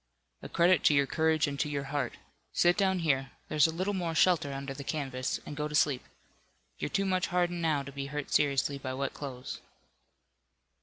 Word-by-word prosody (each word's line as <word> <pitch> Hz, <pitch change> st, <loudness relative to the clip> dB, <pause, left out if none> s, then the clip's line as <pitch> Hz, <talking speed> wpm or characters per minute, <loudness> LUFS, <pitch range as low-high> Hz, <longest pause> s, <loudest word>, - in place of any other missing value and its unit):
"A -, -, -8 dB
credit 175 Hz, +1 st, +4 dB
to 150 Hz, -, +6 dB
your 140 Hz, 0 st, +4 dB
courage 160 Hz, +2 st, +2 dB
and 140 Hz, -1 st, -4 dB
to 150 Hz, -, 0 dB
your 140 Hz, -1 st, -2 dB
heart. 140 Hz, -4 st, -1 dB, 0.4 s
Sit 175 Hz, 0 st, +4 dB
down 190 Hz, -2 st, +2 dB
here. 135 Hz, -3 st, +1 dB, 0.2 s
There's 150 Hz, +1 st, +4 dB
a -, -, -2 dB
little 185 Hz, +5 st, -1 dB
more 175 Hz, -4 st, -2 dB
shelter 160 Hz, -4 st, +3 dB
under 135 Hz, 0 st, -5 dB
the 140 Hz, +1 st, -7 dB
canvas, 135 Hz, -3 st, -2 dB
and 145 Hz, -, -6 dB
go 150 Hz, 0 st, -2 dB
to 150 Hz, -, -5 dB
sleep. 140 Hz, -3 st, +3 dB, 0.8 s
You're -, -, -2 dB
too 195 Hz, +4 st, 0 dB
much 185 Hz, -2 st, +1 dB
hardened 175 Hz, -1 st, 0 dB
now 155 Hz, -4 st, +1 dB
to 140 Hz, -, -8 dB
be 140 Hz, 0 st, -5 dB
hurt 145 Hz, 0 st, -5 dB
seriously 140 Hz, -1 st, +2 dB
by 130 Hz, -1 st, -4 dB
wet 140 Hz, +1 st, -2 dB
clothes." 130 Hz, -3 st, -6 dB
150 Hz, 200 wpm, -30 LUFS, 140-170 Hz, 0.8 s, to